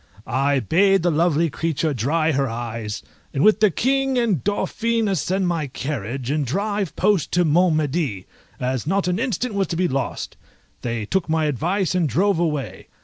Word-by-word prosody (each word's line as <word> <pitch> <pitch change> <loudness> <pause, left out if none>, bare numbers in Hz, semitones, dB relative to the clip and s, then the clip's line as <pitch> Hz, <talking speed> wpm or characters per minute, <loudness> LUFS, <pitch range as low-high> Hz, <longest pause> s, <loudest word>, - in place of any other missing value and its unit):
I 135 +2 +1
bade 195 - +3
the 175 - +3
lovely 165 0 +2
creature 160 0 -1
dry 155 +7 +1
her 135 -2 0
eyes, 115 -2 -5 0.3
and 140 - +2
with 215 - +5
the 215 - +5
King 270 - +1
and 220 - +1
Dauphin 225 +2 0
ascend 190 0 0
my 165 -4 -1
carriage, 130 -1 -4
and 150 0 +1
drive 200 - -2
post 195 -5 +1
to 175 0 +3
Mont 165 +2 +3
Medi, 145 - -1 0.3
as 130 +1 -2
not 195 +2 +1
an 180 +2 0
instant 245 -1 -1
was 195 -1 0
to 170 - -3
be 180 +2 +1
lost. 135 -2 -3 0.4
They 115 -3 -3
took 180 - -1
my 160 0 +2
advice 170 - 0
and 175 -5 +1
drove 185 - +2
away. 150 -5 -2
165 Hz, 175 wpm, -22 LUFS, 135-195 Hz, 0.4 s, with